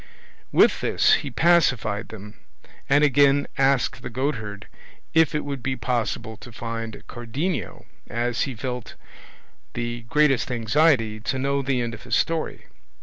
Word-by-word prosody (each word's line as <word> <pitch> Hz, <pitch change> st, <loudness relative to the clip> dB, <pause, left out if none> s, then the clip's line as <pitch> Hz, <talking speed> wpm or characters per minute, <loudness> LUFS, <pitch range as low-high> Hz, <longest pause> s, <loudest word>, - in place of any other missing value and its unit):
With -, -, +4 dB
this -, -, +3 dB
he -, -, -5 dB
pacified 130 Hz, -, +2 dB
them, 105 Hz, -1 st, -11 dB, 0.5 s
and 145 Hz, +2 st, +5 dB
again 140 Hz, 0 st, +4 dB
asked 135 Hz, -1 st, +1 dB
the 125 Hz, -, -6 dB
goatherd 115 Hz, -5 st, -3 dB, 0.5 s
if 160 Hz, -1 st, +4 dB
it 150 Hz, -, -1 dB
would 140 Hz, -3 st, -4 dB
be 130 Hz, +1 st, -2 dB
possible 115 Hz, -3 st, -2 dB
to 120 Hz, -, -12 dB
find 115 Hz, -1 st, -6 dB
Cardenio, 125 Hz, -, -4 dB, 0.2 s
as 120 Hz, +1 st, -1 dB
he 130 Hz, -, -6 dB
felt 125 Hz, 0 st, -5 dB, 0.8 s
the 120 Hz, 0 st, -3 dB
greatest 145 Hz, -3 st, +3 dB
anxiety 115 Hz, -2 st, +2 dB
to 120 Hz, +4 st, -2 dB
know 140 Hz, +1 st, 0 dB
the 130 Hz, -2 st, 0 dB
end 120 Hz, -1 st, -3 dB
of 115 Hz, -, -9 dB
his -, -, -1 dB
story. 165 Hz, -1 st, -1 dB
125 Hz, 145 wpm, -24 LUFS, 115-140 Hz, 0.8 s, and